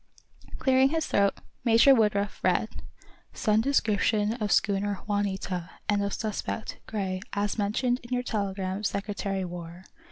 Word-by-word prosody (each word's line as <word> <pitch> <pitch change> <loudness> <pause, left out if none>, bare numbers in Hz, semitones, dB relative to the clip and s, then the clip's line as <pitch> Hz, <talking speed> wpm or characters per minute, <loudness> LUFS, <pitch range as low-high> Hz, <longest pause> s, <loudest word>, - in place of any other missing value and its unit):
Clearing 265 0 +4
his 320 +1 0
throat, 200 -1 +2 0.3
Major 230 +4 +6
Woodruff 210 -4 +1
read: - - +2 0.7
_"Send 215 -1 +2
description 215 -4 +2
of 215 -4 -2
schooner 200 -1 +1
'Juanita,' 195 -4 -2 0.2
and 205 -1 +2
of 200 - -1
suspect, 215 0 -4
Gray, 190 -3 -2
as 205 +2 -1
mentioned 245 +5 +1
in 240 - -14
your 250 0 0
telegram 195 -3 -2
Secretary 200 -1 -2
War. 175 0 -8
205 Hz, 130 wpm, -27 LUFS, 195-225 Hz, 0.7 s, Major